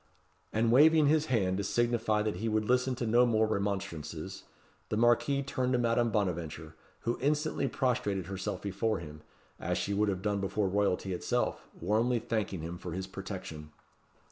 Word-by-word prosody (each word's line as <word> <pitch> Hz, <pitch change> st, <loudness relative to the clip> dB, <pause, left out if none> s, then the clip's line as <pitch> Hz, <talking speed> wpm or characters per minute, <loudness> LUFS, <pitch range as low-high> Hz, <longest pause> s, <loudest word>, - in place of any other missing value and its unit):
And 115 Hz, +1 st, +2 dB
waving 155 Hz, +4 st, +6 dB
his 155 Hz, +1 st, +3 dB
hand 95 Hz, -7 st, +1 dB
to 100 Hz, -, -1 dB
signify 115 Hz, 0 st, +1 dB
that 105 Hz, -4 st, -2 dB
he 110 Hz, +4 st, -1 dB
would 110 Hz, 0 st, +1 dB
listen 125 Hz, +2 st, +2 dB
to 120 Hz, -1 st, -3 dB
no 120 Hz, +2 st, +5 dB
remonstrances, 100 Hz, -7 st, -1 dB, 0.4 s
the 105 Hz, -, -1 dB
Marquis 120 Hz, +4 st, +3 dB
turned 130 Hz, -2 st, -1 dB
to -, -, +3 dB
Madame 120 Hz, 0 st, +2 dB
Bonaventure, 85 Hz, -6 st, -2 dB, 0.3 s
who 120 Hz, -, -2 dB
instantly 150 Hz, 0 st, +1 dB
prostrated 115 Hz, -, 0 dB
herself 95 Hz, +2 st, -4 dB
before 105 Hz, +3 st, 0 dB
him, 75 Hz, -2 st, -9 dB, 0.4 s
as -, -, -1 dB
she 100 Hz, -, -1 dB
would 105 Hz, +1 st, +2 dB
have 95 Hz, -1 st, -3 dB
done 105 Hz, -1 st, 0 dB
before 100 Hz, +1 st, 0 dB
royalty 95 Hz, -1 st, 0 dB
itself, 90 Hz, -, -1 dB
warmly 110 Hz, +7 st, +2 dB
thanking 110 Hz, -6 st, -2 dB
him 85 Hz, +2 st, -5 dB
for 90 Hz, -, -6 dB
his 95 Hz, +1 st, -3 dB
protection. 95 Hz, -6 st, -7 dB
105 Hz, 165 wpm, -31 LUFS, 95-120 Hz, 0.4 s, waving